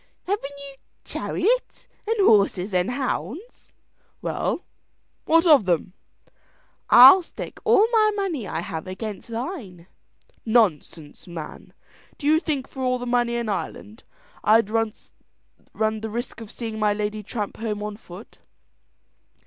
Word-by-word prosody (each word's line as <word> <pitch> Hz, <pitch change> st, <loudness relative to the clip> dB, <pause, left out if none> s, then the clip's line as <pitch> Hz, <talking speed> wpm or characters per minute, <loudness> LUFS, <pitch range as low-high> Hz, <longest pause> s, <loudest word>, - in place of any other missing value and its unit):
"Haven't 285 Hz, -8 st, -3 dB
you 280 Hz, -1 st, -9 dB, 0.3 s
chariot -, -, -1 dB, 0.2 s
and 450 Hz, +1 st, 0 dB
horses 200 Hz, -2 st, +3 dB
and 180 Hz, +3 st, +1 dB
hounds?" 260 Hz, -, -5 dB, 0.5 s
"Well, -, -, -2 dB, 0.6 s
what 330 Hz, +2 st, +4 dB
of 295 Hz, -, +6 dB
them!" 180 Hz, +1 st, 0 dB, 1.0 s
"I'll 265 Hz, +10 st, +10 dB
stake 340 Hz, -, -9 dB
all 420 Hz, -, +5 dB
the 440 Hz, -2 st, +3 dB
money 345 Hz, -, -2 dB
I 165 Hz, -, -3 dB
have 165 Hz, +1 st, -6 dB
against 205 Hz, +2 st, -6 dB
thine." 230 Hz, -, -6 dB, 0.6 s
"Nonsense, 180 Hz, -, 0 dB
man! 165 Hz, -3 st, -9 dB, 0.5 s
Do 285 Hz, -, -8 dB
you 310 Hz, +2 st, +4 dB
think 285 Hz, -5 st, -3 dB
for 265 Hz, -, -9 dB
all 255 Hz, -1 st, +1 dB
the 245 Hz, -, -6 dB
money 240 Hz, -1 st, +1 dB
in 235 Hz, -1 st, -2 dB
Ireland, 210 Hz, +2 st, -5 dB, 0.4 s
I'd 215 Hz, -1 st, +4 dB
run 225 Hz, -1 st, 0 dB, 0.8 s
the 220 Hz, 0 st, -1 dB
risk 235 Hz, +1 st, -5 dB
of 220 Hz, -, -9 dB
seeing 225 Hz, -2 st, -6 dB
my 210 Hz, -1 st, +2 dB
lady 210 Hz, 0 st, -3 dB
tramp 210 Hz, 0 st, -5 dB
home 210 Hz, -2 st, -3 dB
on 210 Hz, 0 st, -5 dB
foot?" 200 Hz, -1 st, -13 dB
225 Hz, 135 wpm, -24 LUFS, 205-280 Hz, 1.0 s, I'll